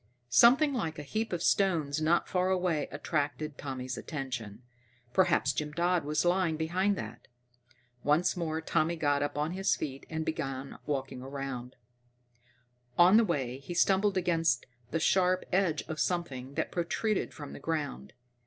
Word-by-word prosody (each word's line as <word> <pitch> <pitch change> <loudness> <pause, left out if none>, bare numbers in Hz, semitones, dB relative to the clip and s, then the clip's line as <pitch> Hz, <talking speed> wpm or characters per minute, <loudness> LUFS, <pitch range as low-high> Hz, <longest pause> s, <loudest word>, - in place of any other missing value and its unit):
Something 260 - +6
like 165 -11 -2
a 150 - -5
heap 220 +10 -2
of 175 -1 -2
stones 160 -7 +2
not 165 +3 +2
far 185 0 +1
away 180 -5 +1
attracted 150 0 -2
Tommy's 130 -3 -5
attention. 130 -7 -5 0.5
Perhaps 185 -2 +3
Jim 150 -1 -3
Dodd 175 0 +1
was 150 +3 0
lying 175 -2 +2
behind 185 +6 +1
that. - - -8 0.8
Once 155 +6 +3
more 160 -2 -2
Tommy 160 +1 +1
got 145 -3 +1
upon 145 +2 -1
his 190 +2 +1
feet 135 -2 -6
and 160 0 -3
began 135 -3 -4
walking 135 -3 -2
toward 135 +2 -6
it. 125 -2 -6 1.2
On 180 +3 +7
the 230 - +6
way, 135 - -2
he 170 +6 -7
stumbled 195 +2 +3
against 165 -7 +1 0.2
the 165 - -1
sharp 185 +2 +3
edge 180 -5 +2
of 155 -1 -6
something 140 -6 -2
that - - -1
protruded 190 +5 -1
from 145 -2 -9
the - - -8
ground. 145 - -3
160 Hz, 155 wpm, -30 LUFS, 140-180 Hz, 1.2 s, On